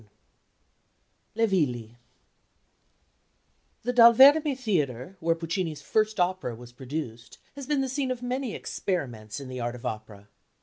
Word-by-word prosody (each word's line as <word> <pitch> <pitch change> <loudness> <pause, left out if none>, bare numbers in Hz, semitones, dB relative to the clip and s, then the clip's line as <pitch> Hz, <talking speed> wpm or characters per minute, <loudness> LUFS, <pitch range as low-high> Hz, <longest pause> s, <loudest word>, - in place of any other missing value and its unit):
IV 110 - -23 1.3
"LE - - +6
VILLI" 125 - -1 1.9
The 245 +2 -1
Dal 235 -1 +8
Verme 285 +3 +7
Theatre, 160 - -2
where 165 0 +1
Puccini's 165 -1 -3
first 215 -1 0
opera 180 -9 0
was 120 +1 -12
produced, 125 -3 -7 0.2
has 280 -2 -8
been 290 -2 +1
the 265 - -1
scene 265 0 -2
of 250 -1 -4
many 250 -1 -3
experiments 120 - -4
in 135 - -8
the 130 0 -6
art 120 0 -3
of 120 - -11
opera. 105 -2 -6
165 Hz, 140 wpm, -27 LUFS, -, 1.9 s, Dal